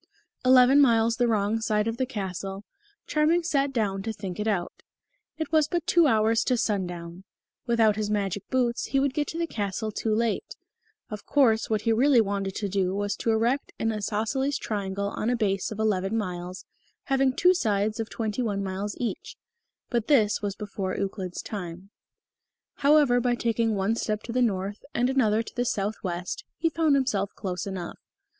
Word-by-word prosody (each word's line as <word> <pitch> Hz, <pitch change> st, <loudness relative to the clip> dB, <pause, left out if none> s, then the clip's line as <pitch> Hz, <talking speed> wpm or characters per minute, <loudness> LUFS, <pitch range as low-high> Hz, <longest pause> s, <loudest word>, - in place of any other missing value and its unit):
Eleven 255 Hz, +2 st, +6 dB
miles 230 Hz, -3 st, +3 dB
the 245 Hz, -, +2 dB
wrong 215 Hz, 0 st, +1 dB
side 215 Hz, -1 st, +1 dB
of 225 Hz, 0 st, -2 dB
the 260 Hz, -, -1 dB
castle, 195 Hz, -3 st, -5 dB, 0.4 s
Charming 315 Hz, +3 st, +2 dB
sat 280 Hz, -4 st, +1 dB
down 205 Hz, -6 st, -1 dB
to 225 Hz, -, -3 dB
think 195 Hz, -3 st, -6 dB
it 210 Hz, -, -1 dB
out. 190 Hz, -5 st, -2 dB, 0.6 s
It 315 Hz, -1 st, -4 dB
was 310 Hz, -2 st, +4 dB
but 345 Hz, -1 st, -2 dB
two 340 Hz, -2 st, +4 dB
hours 225 Hz, -2 st, +3 dB
to 250 Hz, -, +2 dB
sundown. 180 Hz, -4 st, -3 dB, 0.4 s
Without 225 Hz, -3 st, +3 dB
his 210 Hz, -1 st, -1 dB
magic 205 Hz, -2 st, -2 dB
boots 245 Hz, -2 st, 0 dB
he 275 Hz, -, +1 dB
would 275 Hz, -1 st, +1 dB
get 295 Hz, +1 st, -1 dB
to 325 Hz, -, -5 dB
the 335 Hz, -, 0 dB
castle 215 Hz, -, -3 dB
too 215 Hz, +1 st, -1 dB
late. 230 Hz, -, -1 dB, 0.6 s
Of 210 Hz, -, -7 dB
course, 230 Hz, -6 st, +3 dB
what 215 Hz, -2 st, +1 dB
he 230 Hz, 0 st, +2 dB
really 255 Hz, +2 st, +4 dB
wanted 195 Hz, -2 st, -1 dB
to 205 Hz, -, -2 dB
do 190 Hz, -1 st, 0 dB
was 205 Hz, +1 st, -1 dB
to -, -, -2 dB
erect 230 Hz, +5 st, +1 dB
an 225 Hz, -, 0 dB
isosceles 225 Hz, +6 st, -1 dB
triangle 200 Hz, -1 st, -3 dB
on 215 Hz, -, -2 dB
a 245 Hz, -, +2 dB
base 195 Hz, -4 st, 0 dB
of 215 Hz, -, -5 dB
eleven 210 Hz, -1 st, 0 dB
miles, 180 Hz, -3 st, -5 dB, 0.4 s
having 270 Hz, -1 st, +2 dB
two 360 Hz, +7 st, +4 dB
sides 215 Hz, -, 0 dB
of 225 Hz, -, -3 dB
twenty 220 Hz, +1 st, -3 dB
one 205 Hz, -4 st, -1 dB
miles 195 Hz, +2 st, -3 dB
each. 310 Hz, -, -4 dB, 0.5 s
But 235 Hz, -3 st, 0 dB
this 220 Hz, -10 st, +3 dB
was 200 Hz, -2 st, -3 dB
before 195 Hz, -2 st, -4 dB
Euclid's 190 Hz, -2 st, -4 dB
time. 185 Hz, -1 st, -7 dB, 0.9 s
However, 285 Hz, -4 st, +4 dB
by 245 Hz, 0 st, +1 dB
taking 230 Hz, -2 st, 0 dB
one 195 Hz, +3 st, +1 dB
step 215 Hz, -2 st, -2 dB
to 230 Hz, -, -6 dB
the 250 Hz, +2 st, +1 dB
north 200 Hz, -3 st, -1 dB
and 245 Hz, +2 st, +2 dB
another 225 Hz, -4 st, +2 dB
to -, -, -12 dB
the 245 Hz, -, +1 dB
southwest, 195 Hz, -, -3 dB
he 330 Hz, -, +1 dB
found 315 Hz, -2 st, +2 dB
himself 210 Hz, -8 st, 0 dB
close 185 Hz, -2 st, -4 dB
enough. 185 Hz, -3 st, -6 dB
220 Hz, 180 wpm, -26 LUFS, 200-250 Hz, 0.9 s, Eleven